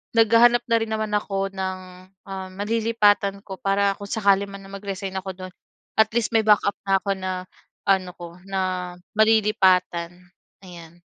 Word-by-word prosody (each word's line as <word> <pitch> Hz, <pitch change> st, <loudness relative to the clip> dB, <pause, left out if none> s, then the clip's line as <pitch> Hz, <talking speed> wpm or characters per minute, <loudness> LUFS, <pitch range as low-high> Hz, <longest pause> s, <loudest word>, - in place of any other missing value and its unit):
naghahanap 230 Hz, +2 st, +5 dB
na 230 Hz, -, +5 dB
rin 225 Hz, -, -2 dB
naman 215 Hz, -1 st, -2 dB
ako 195 Hz, -1 st, -2 dB
ng, 190 Hz, -1 st, -4 dB, 0.5 s
um, 190 Hz, -1 st, -6 dB
malilipatan 205 Hz, -2 st, +1 dB
ko, 190 Hz, -2 st, -8 dB
para 200 Hz, 0 st, +2 dB
kung 200 Hz, -, -7 dB
sakali 200 Hz, -2 st, +2 dB
man 195 Hz, 0 st, -10 dB
na 195 Hz, -, -13 dB
mag-resign 195 Hz, -1 st, -5 dB
ako 190 Hz, 0 st, -6 dB
dun 185 Hz, -1 st, -9 dB, 0.5 s
at 220 Hz, -, +6 dB
least 235 Hz, -1 st, +1 dB
may 220 Hz, -2 st, +2 dB
backup 205 Hz, -1 st, +4 dB
na 195 Hz, -, +4 dB
ako, 200 Hz, -, -2 dB
na 185 Hz, 0 st, -3 dB, 0.6 s
ano 185 Hz, -2 st, +2 dB
ko 170 Hz, 0 st, -10 dB
na 185 Hz, -2 st, -2 dB, 0.2 s
malilipatan 190 Hz, -6 st, +3 dB, 0.5 s
ayan. 175 Hz, -2 st, -13 dB
195 Hz, 155 wpm, -23 LUFS, 185-215 Hz, 0.6 s, at